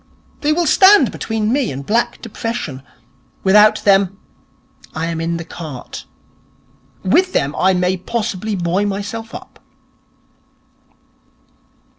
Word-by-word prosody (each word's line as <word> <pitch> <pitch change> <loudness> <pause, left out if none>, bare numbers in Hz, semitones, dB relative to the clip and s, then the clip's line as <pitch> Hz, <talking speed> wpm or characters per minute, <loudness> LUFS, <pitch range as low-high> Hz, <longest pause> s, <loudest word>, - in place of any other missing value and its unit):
They 300 - +1
will 340 +2 +1
stand 380 - +6
between 220 0 -2
me 270 -4 0
and 135 +1 -7
black 230 +7 -1
depression. 225 - -5 0.6
Without 210 +2 +5
them 195 -1 +3 0.8
I 160 +1 -2
am 165 -1 -3
in 165 +1 -2
the 170 - -5
cart. 155 -8 -8 1.0
With 365 - +2
them 140 +2 0
I 190 0 +2
may 180 +1 +1
possibly 210 +1 -3
buoy 180 +2 0
myself 205 +3 -4
up.' - - -11
200 Hz, 115 wpm, -18 LUFS, 175-230 Hz, 1.0 s, stand